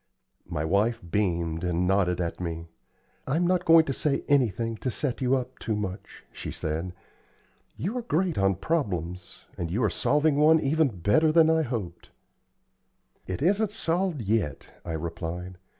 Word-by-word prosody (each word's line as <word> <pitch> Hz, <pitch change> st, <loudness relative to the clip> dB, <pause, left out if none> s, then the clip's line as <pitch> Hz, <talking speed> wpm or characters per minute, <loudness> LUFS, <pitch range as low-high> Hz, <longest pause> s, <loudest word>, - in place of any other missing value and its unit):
My 80 Hz, -3 st, -2 dB
wife 105 Hz, +7 st, +1 dB
beamed 85 Hz, -4 st, -1 dB
and 90 Hz, 0 st, 0 dB
nodded 90 Hz, -2 st, +2 dB
at 85 Hz, -1 st, -3 dB
me. 85 Hz, -2 st, -5 dB, 0.6 s
"I'm 160 Hz, +6 st, +1 dB
not 180 Hz, 0 st, +1 dB
going 165 Hz, -1 st, +7 dB
to 135 Hz, -, -2 dB
say 140 Hz, +1 st, 0 dB
anything 115 Hz, -5 st, +1 dB
to 130 Hz, -, -3 dB
set 130 Hz, +1 st, -2 dB
you 130 Hz, +1 st, +3 dB
up 130 Hz, 0 st, -4 dB
too 110 Hz, -, -2 dB
much," 100 Hz, -1 st, -6 dB
she -, -, -7 dB
said. 80 Hz, +4 st, -4 dB, 0.8 s
"You 200 Hz, +8 st, -3 dB
are -, -, -3 dB
great 185 Hz, -6 st, 0 dB
on 95 Hz, 0 st, +2 dB
problems, 90 Hz, -, -3 dB
and 85 Hz, -, -2 dB
you 110 Hz, +8 st, 0 dB
are 105 Hz, -, +2 dB
solving 150 Hz, -, +2 dB
one 155 Hz, +2 st, +6 dB
even 155 Hz, +2 st, +2 dB
better 105 Hz, -, +2 dB
than 160 Hz, 0 st, +5 dB
I 160 Hz, 0 st, +3 dB
hoped." 110 Hz, -, -5 dB, 1.2 s
"It 95 Hz, +7 st, -3 dB
isn't 205 Hz, +5 st, +2 dB
solved 175 Hz, -, -1 dB
yet," 100 Hz, -9 st, -1 dB
I 85 Hz, -, -5 dB
replied. 85 Hz, +2 st, -5 dB
110 Hz, 160 wpm, -27 LUFS, -, 1.2 s, going